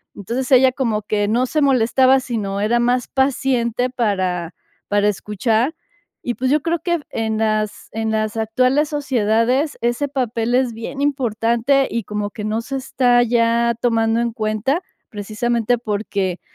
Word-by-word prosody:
entonces, 245 +7 -4
ella 260 0 +6
como 230 -5 -1
que 205 -1 0
no 240 +4 +2
se 305 +4 0
molestaba, 260 0 +4
sino 205 -5 -3
era 230 +3 +2
más 245 +1 +1
paciente 255 -2 0
para 185 -8 -1 0.4
para 205 0 +2
escuchar. 220 - -1 0.5
Y 240 - -2
pues 260 +1 -1
yo 300 - +3
creo 335 +3 -1
que 345 -1 -1
en 220 -1 -2
las 215 -1 -1
en 220 0 -2
las 215 +1 -1
actuales 255 +7 +1
sociedades 255 0 +1
ese 240 +4 0
papel 240 -3 -1
es 255 -2 +2
bien 230 +5 -6
importante, 255 -1 +1
y 230 0 -2
como 210 +1 -3
que 210 - -7
no 215 +1 -1
se 270 +3 -4
está 245 -2 +2
ya 235 0 +2
tomando 225 -1 +2
en 235 -1 -2
cuenta, 220 - -1 0.3
precisamente 230 +3 -1
porque, 200 -4 -2
235 Hz, 150 wpm, -20 LUFS, 215-260 Hz, 0.5 s, ella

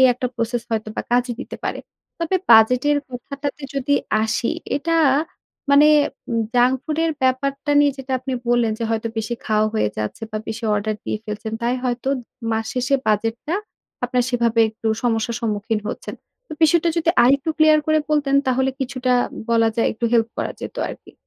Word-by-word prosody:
এই 260 - +8
একটা 250 - -2
process 235 0 -2
হয়তোবা 220 -1 -2
কাজে 245 0 +2
দিতে - - -7
পারে। - - -2 0.4
তবে 335 +3 0
বাজেটের 250 +6 +6
কথাটাতে 280 +4 -6
যদি 275 +1 +1 0.3
আসি 220 +2 0 0.3
এটা 330 +3 0 0.7
মানে 285 +2 +7 0.7
জাঙ্ক 245 +2 +4
ফুড 310 0 -3
এর 325 - +1
ব্যাপারটা 275 +3 0
নিয়ে 290 -1 +4
যেটা 265 0 -5
আপনি 260 +1 -5 0.2
বললেন 240 -2 +2
যে 230 - -2
হয়তো 225 0 -1
বেশি 225 +2 -2
খাওয়া 215 0 +2
হয়ে 215 - +2
যাচ্ছে 110 - -4
বা 215 - -3
বেশি 225 +1 -5
অর্ডার 215 +1 -1
দিয়ে 215 - -2
ফেলছেন। 215 +1 -5
তাই 240 +1 +1
হয়তো 250 +1 -1 0.4
মাস 220 0 -1
শেষে 250 +2 +1
বাজেট 220 +1 +1
টা 330 - 0 0.5
আপনার 250 -2 +1
সেভাবে 235 -2 +2
একটু 220 +1 -8 0.2
সমস্যার 230 -1 0
সম্মুখীন 215 0 -1
হচ্ছেন। - - -6 0.3
তো - - -8
বিষয়টা 335 +2 +4
যদি 335 0 +3
আরেকটু 275 +4 +3
ক্লিয়ার 310 0 +6
করে 310 0 +3
বলতেন 285 -2 +2
তাহলে 260 +1 +2
কিছুটা 255 -1 -1 0.4
বলা 230 -1 +4
যায় 230 - +2
একটু 230 +2 -5
হেল্প 230 -1 +3
করা - - -2
যেত - - -7
আরকি। - - -10
245 Hz, 170 wpm, -21 LUFS, 225-275 Hz, 0.7 s, এই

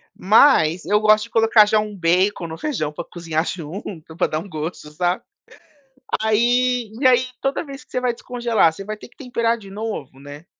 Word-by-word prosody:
mas 185 - +4
eu 210 +1 +3
gosto 215 0 +4
de - - -16
colocar 225 -1 +5
já 215 +1 +3
um 210 -1 -4
bacon 180 +1 +1
no 160 0 -7
feijão, 180 - -2
pra 175 - -5
cozinhar 165 -2 -3
junto, 165 -1 -7
pra 180 - +2
dar 155 - -2
um 195 - -9
gosto, 155 -1 -6
sabe, 180 +7 -1 1.0
aí, 240 +1 +1
e 275 - +3
aí, 255 0 +4
toda 270 +4 -1
vez 275 -1 -10
que - - -38
você 250 - -2
vai 250 -1 0
descongelar, 235 -7 +1
você 195 +5 -9
vai 215 +1 -5
ter - - -13
que - - -29
temperar 235 -3 -1
de 200 -3 -13
novo, 200 - -6
né, 145 +3 -11
210 Hz, 200 wpm, -21 LUFS, 165-235 Hz, 1.0 s, colocar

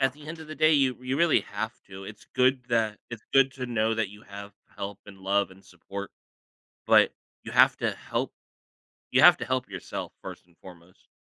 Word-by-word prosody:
at 135 -1 +2
the 150 +2 -15
end 165 +2 -7
of 160 - -10
the 155 - -6
day, 155 +2 +4
you 135 -3 +3
you 130 +1 -2
really 170 0 +4
have 110 +1 -4
to, 95 0 -10
it's 105 +2 -11
good 130 0 +3
that 110 -3 +1
it's 115 -2 -8
good 135 -1 +5
to 130 -1 -5
know 115 -2 +1
that 110 -3 -1
you 105 +1 -14
have 100 0 -10 0.2
help 100 0 -5
and 100 -1 -12
love 100 +1 0
and 95 +1 -17
support, 95 +2 -8 0.8
but - - +5 0.3
you - - -8
have - - +6
to - - 0
help - - -4 0.8
you - - +4
have - - +9
to - - -5
help 130 -4 -1
yourself 95 -3 -6
first - - -9
and 85 -2 -28
foremost. 90 0 -16
110 Hz, 210 wpm, -27 LUFS, 100-130 Hz, 0.8 s, have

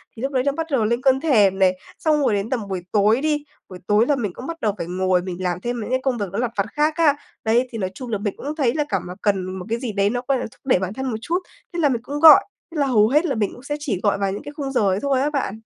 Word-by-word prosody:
thì 225 - -9
lúc 270 +1 -2
đấy 255 -2 +1
nó 280 - +2
bắt 320 +3 -4
đầu 240 -6 +2
lên 235 +3 0
cơn 265 0 +3
thèm 205 -11 +3
nè. 185 -1 +5 0.3
Xong 310 -2 +2
rồi 250 - +2
đến 200 +2 -1
tầm 230 -6 -2
buổi 190 -2 -3
tối 215 +4 +3
đi, 300 -1 0 0.3
buổi 185 -1 -9
tối 210 +2 +4
là 290 - +3
mình 210 -8 -3
cũng 255 - -8
bắt 330 -1 -6
đầu 210 -2 +1
phải 170 -1 -4
ngồi 185 0 +1
mình 185 0 -6
làm 180 0 -1
thêm 240 +2 -3
mấy - - -5
cái 260 +1 +1
công 265 -3 0
việc 205 - -1
nó 200 - -4
lặt 240 -1 -1
vặt 200 - +2
khác 300 +1 +2
á. 305 -4 +4 0.3
Đấy, 235 +3 +2
thì 230 - -5
nói 185 -3 -2
chung 250 +1 -8
là 210 - 0
mình 205 -1 -3
cũng 295 +2 -5
thấy 260 -6 +1
là 300 - +1
cảm 195 -4 0
mà 180 - -6
cần 195 -3 +1
một 180 - -7
cái 230 +1 -1
gì 245 -4 -3
đấy, 200 0 +1
nó, 245 +2 -2
gọi 275 -2 +2
là, - - -3
thúc - - -23
đẩy 250 -9 +3
bản 190 +1 -3
thân 265 +3 -4
một 220 - -2
chút, 335 +10 -1 0.3
thế 345 - -3
là 295 - +3
mình 240 -3 -1
cũng 285 +3 -4
gọi. 310 -2 +9 0.3
Thế 325 - -7
là 280 - +2
hầu 215 -4 +4
hết 300 +8 +3
là 275 -7 0
mình 210 -2 0
cũng 245 - -13
sẽ 290 +2 -3
chỉ 240 - -2
gọi 205 -1 +2
vào 195 -1 -1
những 200 - -5
cái 290 - -7
khung 275 -2 -3
giờ 260 - +1
ấy 190 +1 +1
thôi 275 -2 +1
á 290 - +1
bạn. 265 -7 -3
235 Hz, 330 wpm, -22 LUFS, 200-280 Hz, 0.3 s, gọi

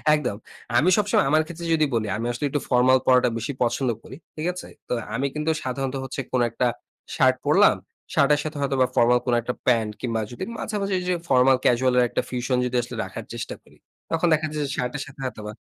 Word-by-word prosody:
একদম। 125 -9 -2 0.4
আমি 160 +9 +4
সবসময় 205 -7 +2
আমার 155 +1 +4
ক্ষেত্রে 170 +1 -7
যদি 155 -1 +3
বলি, 110 -1 0
আমি 115 - -3
আসলে 120 +5 -3
একটু 145 +1 -1
ফরমাল 130 +1 +5
পড়াটা 125 -1 +5
বেশি 115 +5 -3
পছন্দ 120 +2 0
করি। 130 - -10 0.2
ঠিক 155 +2 -3
আছে? 180 - -8 0.2
তো - - 0 0.2
আমি 140 - 0
কিন্তু 150 +1 0
সাধারণত 135 +1 -3
হচ্ছে 135 +1 -4
কোন 125 - +2
একটা, 125 +2 +1 0.5
শার্ট - - +4
পড়লাম। - - +5 0.4
শার্টের 145 +1 +4
সাথে 155 -1 -5
হয়তোবা 135 -2 +2
ফরমাল 120 +1 +4
কোন 125 - +1
একটা 125 +2 -3
প্যান্ট 115 -3 +3
কিংবা 115 -3 -1
যদি 120 - -6
মাঝামাঝি 200 -3 -2
যে 180 - +2
ফরমাল 130 0 +5
ক্যাজুয়াল 125 +1 +3
এর 125 - +6
একটা - - 0
fusion 125 0 -1
যদি 125 - -3
আসলে 120 - -7
রাখার - - -7
চেষ্টা - - -5
করি। - - -22 0.3
তখন 165 +2 +2
দেখা 155 0 +1
যায় 150 - -2
যে, - - -5
শার্টের 125 +3 -2
সাথে 140 +2 -15
হয়তোবা 105 -4 -5
130 Hz, 205 wpm, -24 LUFS, 125-150 Hz, 0.5 s, এর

